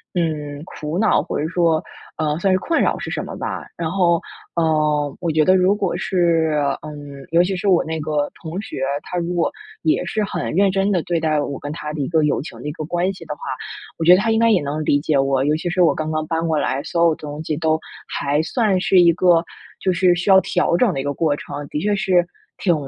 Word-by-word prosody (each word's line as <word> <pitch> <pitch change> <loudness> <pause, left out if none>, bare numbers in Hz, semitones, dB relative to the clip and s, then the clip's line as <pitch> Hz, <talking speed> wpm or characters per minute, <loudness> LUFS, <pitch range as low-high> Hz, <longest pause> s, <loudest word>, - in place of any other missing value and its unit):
嗯， 150 -4 -2
苦 155 -1 -5
恼， 220 - +3
或 - - -3
者 155 - -1
说， 170 -3 +2 0.3
呃 155 -1 0
算 190 +1 +2
是 - - +4
困 330 - 0
扰 - - +1
是 - - -5
什 - - -2
么 - - -7
吧。 - - -5
然 165 -1 -2
后， 175 -3 +2 0.3
呃 150 -3 +1
我 170 -2 -2
觉 155 0 +3
得 185 +3 +5
如 185 +2 +3
果 190 - -1
是 170 -5 +1 0.3
嗯， 145 -2 -9
尤 170 +1 +5
其 190 +1 -1
是 200 +2 -3
我 180 -3 +4
那 160 0 -4
个 150 -1 -1
同 170 +5 -5
学， 220 -11 -7 0.2
他 180 - -5
如 175 +1 -2
果 175 -1 +1 0.3
也 160 +2 +1
是 215 +2 -1
很 205 - -3
认 195 0 +4
真 195 +1 +1
地 180 - +2
对 170 -1 -1
待 155 -2 +1
我 140 -1 -4
跟 145 - -6
他 150 -1 -5
的 150 - -5
一 135 - -1
个 160 +1 +2
友 150 - +1
情 - - -9
的 - - -10
一 - - -3
个 155 - -6
关 175 +3 0
系 175 -3 -12
的 155 - -4
话， - - -25 0.6
我 160 - -2
觉 175 - +7
得 - - +3
他 225 - 0
应 225 - +2
该 230 0 +4
也 190 -7 +3
能 150 +2 -3
理 145 - +3
解 150 -1 +1
我。 135 -1 +1
尤 150 - +2
其 170 - -5
是 180 +1 +1
我 170 - +5
刚 155 0 -3
刚 155 0 -1
搬 165 +1 -1
过 160 -1 +1
来， 135 0 -1
所 170 +1 +1
有 160 - +2
东 150 +1 -7
西 155 -2 -2
都 160 0 +1 0.3
还 145 +1 -1
算 200 +1 +1
是 185 -1 +4
一 170 -1 +6
个 175 -1 +4 0.4
就 185 - +2
是 180 0 +3
需 180 +3 -2
要 190 - +8
调 175 -1 +1
整 220 -5 +3
的 135 - -3
一 - - -5
个 145 - -1
过 150 -1 +1
程， 145 0 -7
的 150 - -3
确 205 +1 +1
是 180 -3 +2 0.3
挺 175 -3 +2
165 Hz, 275 characters per minute, -20 LUFS, 150-180 Hz, 0.6 s, 要